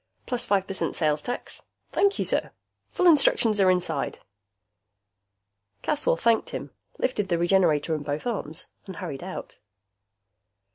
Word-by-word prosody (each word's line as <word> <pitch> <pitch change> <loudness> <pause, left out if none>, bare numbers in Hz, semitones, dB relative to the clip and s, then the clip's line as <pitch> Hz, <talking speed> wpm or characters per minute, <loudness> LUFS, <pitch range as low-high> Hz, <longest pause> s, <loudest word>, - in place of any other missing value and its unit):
Plus 245 -2 -2
five 195 -2 +2
percent 195 -1 -2
sales 150 -2 +1
tax. 245 - -6 0.3
Thank 400 0 +2
you, - - -1
sir. - - 0 0.4
Full 365 - 0
instructions 235 - +5
are 190 - +5
inside." 180 -1 0 1.7
Caswell - - +1
thanked 230 -1 +2
him, - - -6 0.3
lifted 210 -6 -1
the 170 - +2
Regenerator 170 -3 +3
in 155 - -2
both 145 +4 -4
arms 185 -8 -2 0.2
and 190 - -7
hurried 165 -8 -6
out. 185 +1 -7
190 Hz, 135 wpm, -26 LUFS, 165-240 Hz, 1.7 s, instructions